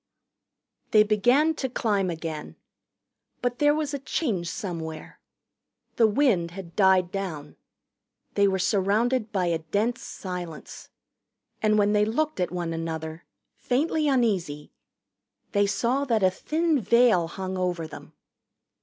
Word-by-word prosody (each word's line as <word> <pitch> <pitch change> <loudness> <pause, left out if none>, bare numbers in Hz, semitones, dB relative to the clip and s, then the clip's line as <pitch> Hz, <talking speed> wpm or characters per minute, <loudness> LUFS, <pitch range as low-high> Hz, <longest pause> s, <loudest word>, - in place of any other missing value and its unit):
They 215 -1 +6
began 245 +9 +3
to 270 -4 -3
climb 205 -6 0
again. 160 -2 -5 0.8
But 245 0 -2
there 295 0 +4
was 305 -2 -2
a 280 - -2
change 220 - -2
somewhere. 165 -6 -6 0.8
The 225 - +6
wind 215 -8 +2
had 170 -1 -10
died 190 -3 +4
down. 170 -7 -5 0.8
They 200 0 +3
were 190 -1 +1
surrounded 215 +5 +1
by 190 -3 0
a 170 -2 0
dense 205 +9 -1
silence. 180 -4 -7 0.7
And 215 0 +3
when 205 0 +3
they 210 0 +4
looked 300 +4 -1
at 180 - 0
one 175 -2 -3
another, 160 0 -5 0.3
faintly 300 +4 0
uneasy, 195 - 0 0.8
they 205 -1 +2
saw 235 +7 0
that 225 -6 +1
a 185 - +5
thin 310 - 0
veil 220 -5 +4
hung 190 +2 -5
over 180 -3 -1
them. 155 - -11
200 Hz, 130 wpm, -26 LUFS, 175-245 Hz, 0.8 s, They